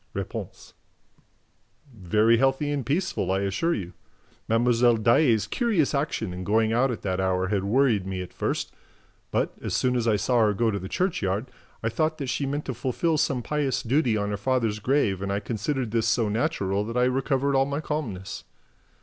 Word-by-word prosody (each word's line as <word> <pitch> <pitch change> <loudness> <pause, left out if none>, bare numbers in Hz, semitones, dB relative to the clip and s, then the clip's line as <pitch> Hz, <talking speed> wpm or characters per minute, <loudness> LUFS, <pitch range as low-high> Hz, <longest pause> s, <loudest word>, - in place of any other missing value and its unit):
R. - - -1 1.7
"Very 110 +3 +3
healthy 135 +3 +1
and 145 -2 -1
peaceful, 155 - -1
I 95 +1 +1
assure 100 - 0
you. 90 -3 -6 0.6
Mlle. 120 +1 +3
Daae's 115 -1 +3
curious 180 - +1
action 140 - -1
in 90 +1 -6
going 110 +3 +2
out 130 +3 +3
at 120 - -4
that 95 -1 -1
hour 95 0 0
had 100 -2 0
worried 110 -3 +2
me 95 -1 -3
at 90 - -12
first; - - -2 0.6
but, - - 0
as - - -2
soon 125 -1 +1
as 120 -2 0
I 110 - +4
saw 120 +5 +1
her 105 -2 +3
go 115 +1 +1
to 100 - -2
the 95 0 -7
churchyard, 110 - -1 0.3
I 115 - +1
thought 155 +7 0
that 140 -4 -4
she 140 +1 -1
meant 145 +2 -3
to 130 - -3
fulfil 135 +7 0
some 125 -3 0
pious 145 -2 -1
duty 125 -2 +2
on 100 0 -1
her 105 - -2
father's 115 -2 0
grave 110 -5 +1
and 100 0 -2
I 100 - 0
considered 120 +3 -3
this 115 -1 +1
so 110 0 +2
natural 105 -5 0
that 115 +2 -4
I 125 - +3
recovered 135 +2 +1
all 135 0 +3
my 140 +1 -2
calmness. 115 -12 -4
115 Hz, 190 wpm, -26 LUFS, 105-135 Hz, 1.7 s, I